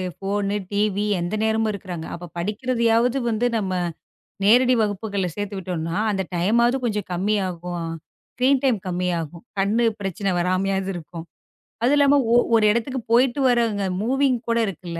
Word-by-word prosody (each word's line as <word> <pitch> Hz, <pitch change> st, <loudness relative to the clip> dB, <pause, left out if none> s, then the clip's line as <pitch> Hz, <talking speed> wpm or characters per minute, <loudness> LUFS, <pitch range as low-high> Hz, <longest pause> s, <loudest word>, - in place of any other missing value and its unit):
Phone, 200 Hz, +1 st, -2 dB, 0.2 s
TV 205 Hz, -1 st, +1 dB, 0.3 s
எந்த 175 Hz, +5 st, -2 dB
நேரமும் 220 Hz, 0 st, +1 dB
இருக்குறாங்க. 180 Hz, -5 st, -6 dB
அப்பப் 175 Hz, 0 st, -11 dB
படிக்கிறதயாவது 235 Hz, +4 st, +1 dB
வந்து 230 Hz, +2 st, +1 dB
நம்ம 190 Hz, -3 st, -2 dB, 0.7 s
நேரடி 250 Hz, +4 st, +5 dB
வகுப்புகள்ல 205 Hz, -2 st, -2 dB
சேர்த்துவிட்டோம்னா, 185 Hz, -5 st, -4 dB
அந்த 195 Hz, -1 st, 0 dB
டைமாவது 235 Hz, +8 st, +2 dB
கொஞ்சம் 210 Hz, -4 st, -2 dB
கம்மியாகும். 180 Hz, -3 st, -2 dB, 0.5 s
ஸ்கிரீன் 260 Hz, +2 st, +2 dB
டைம் 250 Hz, -5 st, +3 dB
கம்மியாகும். 175 Hz, -2 st, -2 dB, 0.2 s
கண்ணு 215 Hz, +5 st, +2 dB, 0.2 s
பிரச்சனை 195 Hz, 0 st, -2 dB
வராமயாவது 190 Hz, +2 st, 0 dB
இருக்கும். 165 Hz, 0 st, -8 dB, 0.6 s
அது 255 Hz, +4 st, +4 dB
இல்லாம 285 Hz, 0 st, +5 dB, 0.2 s
ஒ -, -, +6 dB, 0.2 s
ஒரு 220 Hz, -1 st, +4 dB
இடத்துக்குப் 235 Hz, +1 st, -3 dB
போயிட்டு 250 Hz, +3 st, +3 dB
வரவங்க 230 Hz, -4 st, +1 dB, 0.2 s
மூவிங்க் 260 Hz, +1 st, +1 dB
கூட 230 Hz, -, +2 dB
இருக்குல்ல. 170 Hz, -2 st, -6 dB
205 Hz, 130 wpm, -23 LUFS, 180-235 Hz, 0.7 s, ஒ